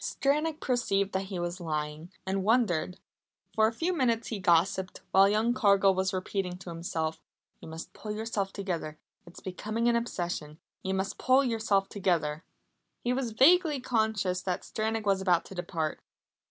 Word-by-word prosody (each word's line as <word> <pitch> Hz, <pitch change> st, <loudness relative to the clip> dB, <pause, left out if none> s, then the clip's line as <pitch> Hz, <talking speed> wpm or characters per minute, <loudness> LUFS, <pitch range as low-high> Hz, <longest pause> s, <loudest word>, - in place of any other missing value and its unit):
Stranack 300 Hz, +3 st, 0 dB
perceived 200 Hz, -6 st, 0 dB
that 190 Hz, +1 st, -1 dB
he 190 Hz, -1 st, -5 dB
was 175 Hz, +1 st, -3 dB
lying, 155 Hz, +1 st, -4 dB
and 190 Hz, 0 st, -1 dB
wondered. 205 Hz, -6 st, +1 dB, 0.5 s
For 220 Hz, 0 st, +4 dB
a -, -, 0 dB
few 335 Hz, +10 st, -1 dB
minutes 235 Hz, -7 st, +1 dB
he 220 Hz, -, -3 dB
gossiped, 185 Hz, +1 st, +2 dB
while 195 Hz, +1 st, +6 dB
young 220 Hz, +3 st, +2 dB
Cargill 200 Hz, -4 st, +4 dB
was 190 Hz, 0 st, 0 dB
repeating 185 Hz, -1 st, -2 dB
to 180 Hz, -1 st, -9 dB
himself: 160 Hz, -1 st, -3 dB, 0.4 s
"You -, -, -11 dB
must 160 Hz, +1 st, -8 dB
pull 215 Hz, -, -6 dB
yourself 210 Hz, -2 st, -2 dB
together. 170 Hz, -6 st, -4 dB, 0.3 s
It's 175 Hz, -, -12 dB
becoming 215 Hz, +5 st, -2 dB
an 240 Hz, -, +4 dB
obsession. 175 Hz, -9 st, -3 dB, 0.2 s
You 190 Hz, 0 st, -2 dB
must 190 Hz, +1 st, -2 dB
pull 260 Hz, +2 st, +4 dB
yourself 220 Hz, -5 st, +1 dB
together." 170 Hz, -5 st, 0 dB, 0.6 s
He 245 Hz, -, +1 dB
was 250 Hz, -3 st, -2 dB
vaguely 315 Hz, -, +5 dB
conscious 220 Hz, -7 st, 0 dB
that 180 Hz, -2 st, -2 dB
Stranack 220 Hz, 0 st, -2 dB
was 195 Hz, -1 st, +2 dB
about 180 Hz, -3 st, +2 dB
to -, -, -10 dB
depart. 170 Hz, -4 st, -3 dB
195 Hz, 165 wpm, -29 LUFS, 175-225 Hz, 0.6 s, while